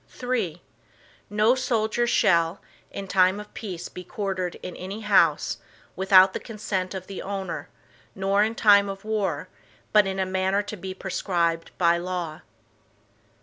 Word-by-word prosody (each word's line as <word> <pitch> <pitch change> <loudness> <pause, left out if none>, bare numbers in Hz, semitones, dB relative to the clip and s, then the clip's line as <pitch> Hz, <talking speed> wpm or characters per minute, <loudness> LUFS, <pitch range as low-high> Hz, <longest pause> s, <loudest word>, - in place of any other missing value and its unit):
III 220 -10 -1 0.7
No 215 +3 +4
soldier 240 -2 0
shall, 170 -5 +3 0.3
in 195 - -6
time 190 +1 +3
of 210 0 -11
peace 185 -6 -6
be 180 - -9
quartered 185 -2 -3
in 180 - -6
any 195 +4 -6
house, 185 -8 +3 0.4
without 190 0 +6
the - - -3
consent 200 -4 -4
of 185 -1 -6
the 195 -1 -7
owner, 190 -6 -5 0.5
nor 195 +1 +2
in 220 +1 -1
time 200 -2 +5
of 195 +1 -7
war, 215 -2 -1 0.5
but 210 -2 +6
in 190 0 -3
a 190 - +1
manner 190 +2 0
to 205 - -6
be 190 -1 -7
prescribed 175 -3 -1
by 170 -1 +3
law. 175 -3 -4
190 Hz, 150 wpm, -25 LUFS, 180-210 Hz, 0.7 s, without